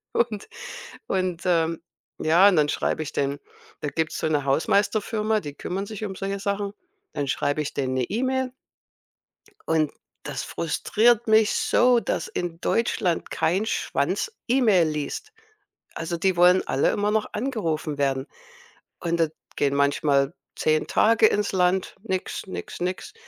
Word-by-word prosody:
Und 225 Hz, -4 st, 0 dB, 0.6 s
und 185 Hz, -2 st, -1 dB
ähm, 165 Hz, -2 st, +1 dB, 0.4 s
ja, 170 Hz, +5 st, +5 dB
und 185 Hz, -, +2 dB
dann 150 Hz, -1 st, +3 dB
schreibe 155 Hz, -, -1 dB
ich 150 Hz, -, -6 dB
denen: 140 Hz, 0 st, -1 dB, 0.4 s
„Da 150 Hz, -, -1 dB
gibt's 160 Hz, +1 st, -2 dB
so -, -, 0 dB
'ne 145 Hz, -3 st, 0 dB
Hausmeisterfirma, 210 Hz, +8 st, +1 dB
die 145 Hz, -2 st, -7 dB
kümmern 190 Hz, +6 st, -4 dB
sich 215 Hz, 0 st, -5 dB
um 190 Hz, -2 st, -5 dB
solche 195 Hz, +1 st, -3 dB
Sachen.“ 200 Hz, 0 st, -2 dB, 0.4 s
Dann 140 Hz, -1 st, -2 dB
schreibe 145 Hz, +2 st, 0 dB
ich 145 Hz, -, -4 dB
denen 130 Hz, -1 st, -1 dB
'ne 130 Hz, -, +1 dB
E-Mail. 260 Hz, -, -1 dB, 1.2 s
Und 155 Hz, -2 st, +2 dB, 0.3 s
das -, -, -4 dB
frustriert 225 Hz, +8 st, +1 dB
mich 220 Hz, 0 st, +5 dB
so, 245 Hz, -1 st, +3 dB
dass -, -, -2 dB
in 175 Hz, -2 st, -4 dB
Deutschland 195 Hz, -6 st, 0 dB
kein 190 Hz, +6 st, +1 dB
Schwanz 455 Hz, -, -1 dB, 0.2 s
E-Mail 215 Hz, -10 st, +4 dB
liest. 150 Hz, -, -4 dB, 0.6 s
Also, 170 Hz, +1 st, -3 dB
die 185 Hz, 0 st, +1 dB
wollen 180 Hz, +1 st, +6 dB
alle 135 Hz, -, +2 dB
immer 205 Hz, 0 st, 0 dB
noch 215 Hz, 0 st, +1 dB
angerufen 170 Hz, -, -2 dB
werden. 135 Hz, -1 st, 0 dB, 0.7 s
Und 170 Hz, -1 st, -1 dB
da 165 Hz, -2 st, +3 dB, 0.3 s
gehen 140 Hz, -1 st, +1 dB
manchmal 140 Hz, +1 st, +2 dB, 0.2 s
10 155 Hz, 0 st, +1 dB
Tage 225 Hz, 0 st, +4 dB
ins 205 Hz, -1 st, +1 dB
Land. 185 Hz, 0 st, +1 dB
Nix, 190 Hz, -2 st, -3 dB
nix, 185 Hz, -, -7 dB
nix. 185 Hz, -, -3 dB
180 Hz, 145 wpm, -25 LUFS, 155-215 Hz, 1.2 s, wollen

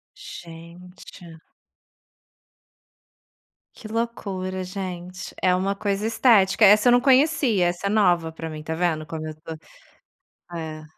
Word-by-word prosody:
Gente. 170 Hz, 0 st, -12 dB, 2.3 s
Que 215 Hz, -, -11 dB
loucura, 195 Hz, -5 st, -4 dB
gente. 185 Hz, -1 st, -7 dB
É 185 Hz, -1 st, +3 dB
uma 195 Hz, +2 st, 0 dB
coisa 200 Hz, +1 st, -2 dB
estética. 220 Hz, -3 st, +4 dB
Essa 210 Hz, +4 st, +6 dB
eu -, -, +6 dB
não 245 Hz, 0 st, +4 dB
conhecia, 265 Hz, -, +3 dB
essa 175 Hz, +3 st, -3 dB
é -, -, 0 dB
nova 175 Hz, -6 st, +2 dB
pra 160 Hz, 0 st, -7 dB
mim. 155 Hz, -1 st, -8 dB
Tá 160 Hz, -, -4 dB
vendo 160 Hz, -2 st, -1 dB
como 155 Hz, 0 st, -6 dB
eu 155 Hz, -, -7 dB
tô 165 Hz, 0 st, -7 dB, 1.0 s
É. 155 Hz, -1 st, -7 dB
185 Hz, 125 wpm, -23 LUFS, 165-210 Hz, 2.3 s, Essa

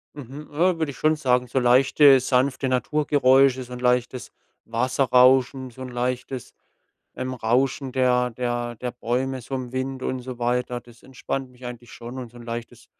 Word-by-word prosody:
Mhm, 145 Hz, +2 st, -9 dB
äh, 170 Hz, +3 st, +2 dB
würde 160 Hz, -3 st, -1 dB
ich 135 Hz, -, -10 dB
schon 155 Hz, 0 st, +2 dB
sagen, 125 Hz, -4 st, +1 dB
so 130 Hz, +2 st, -1 dB
leichte 135 Hz, +3 st, +6 dB
sanfte 130 Hz, +1 st, +1 dB
Naturgeräusche, 135 Hz, -1 st, +3 dB
so 125 Hz, -, -13 dB
'n 125 Hz, -, -6 dB
leichtes 125 Hz, 0 st, 0 dB, 0.3 s
Wasserrauschen, 130 Hz, +2 st, +3 dB
so 130 Hz, +2 st, -11 dB
'n 130 Hz, -, -6 dB
leichtes, 125 Hz, 0 st, -4 dB, 0.6 s
ähm, 130 Hz, 0 st, -4 dB
Rauschen 130 Hz, +3 st, 0 dB
der 125 Hz, -1 st, +2 dB
der 120 Hz, 0 st, -3 dB
der 125 Hz, +2 st, -4 dB
Bäume, 130 Hz, +2 st, -2 dB
so 135 Hz, -, -6 dB
im 125 Hz, -1 st, -5 dB
Wind 130 Hz, 0 st, -3 dB
und 130 Hz, 0 st, -2 dB
so 125 Hz, -1 st, -8 dB
weiter. 125 Hz, 0 st, -1 dB
Das 120 Hz, -1 st, -19 dB
entspannt 130 Hz, 0 st, -5 dB
mich 125 Hz, 0 st, -12 dB
eigentlich 120 Hz, -1 st, -9 dB
schon 120 Hz, +2 st, -8 dB
und 120 Hz, -3 st, -7 dB
so 120 Hz, -, -14 dB
'n 120 Hz, -, -11 dB
leichtes 115 Hz, 0 st, -7 dB
125 Hz, 175 wpm, -24 LUFS, 125-135 Hz, 0.6 s, leichte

